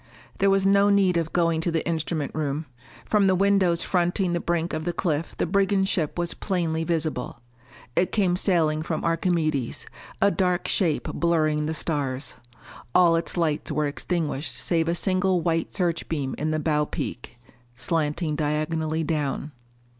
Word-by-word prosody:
There 195 - +4
was 195 0 +3
no 200 +1 +5
need 195 -3 +3
of 165 -1 0
going 165 -2 +1
to 170 - 0
the 160 -1 -1
instrument 160 -2 -2
room. 150 0 -2 0.4
From 205 -2 +3
the 190 - +4
windows 190 -3 +3
fronting 180 0 +1
the 170 - 0
brink 170 0 -1
of 155 0 -2
the 175 +1 -2
cliff 160 -3 -2
the - - +1
brigand 195 +1 +2
ship 165 -6 -1
was 175 -1 0
plainly 165 -4 -1
visible. 160 -8 -2 0.6
It 180 - +2
came 190 -4 +2
sailing 165 -5 +2
from 160 0 -3
Archimedes, 165 -6 0 0.3
a 200 - +4
dark 180 -3 0
shape 170 -7 +1
blurring 155 -3 +1
the 160 - -2
stars. 140 -4 -2 0.6
All 175 -2 +6
its 165 +2 -2
lights 155 -3 0
were 150 - 0
extinguished 150 0 -2
save 165 -2 +1
a 170 - +1
single 185 0 +1
white 165 0 0
search 175 -4 -1
beam 140 -5 -2
in 155 - -1
the 155 0 0
bow 150 -1 +1
peak, 120 0 -5 0.4
slanting 155 +2 -1
diagonally 155 +1 -1
down. 150 -2 -2
165 Hz, 160 wpm, -25 LUFS, 155-180 Hz, 0.6 s, All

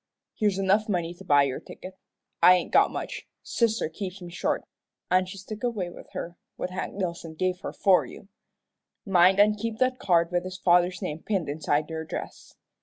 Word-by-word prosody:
Here's 205 -3 0
enough 195 +3 +2
money 175 -3 -1
to 180 +2 -14
buy 145 -5 +5
your 135 -2 -2
ticket. 185 0 -11 0.5
I 180 - +8
ain't 180 - -2
got - - +5
much. - - -6 0.2
Sister 230 -5 0
keeps 185 +3 -6
me 175 -1 -9
short, 180 - -1 0.5
an' 185 0 +3
she's 195 +1 -9
took 215 +3 -8
away 210 -8 -2
with - - -13
her 170 +1 -6 0.2
what 180 - -4
Hank 185 - -4
Dillson 170 -4 -4
give 185 0 0
her - - -5
for 190 -2 +4
you. - - -12 0.8
Mind 190 0 +5
an' 210 +1 +6
keep 220 +1 -4
that 255 +1 +1
card 170 -2 +2
with 175 0 0
his 185 0 -6
father's 180 0 +3
name 150 +1 -3
pinned 195 -6 -1
inside 145 0 0
your 160 0 -3
dress. - - -8
185 Hz, 190 wpm, -26 LUFS, 170-200 Hz, 0.8 s, I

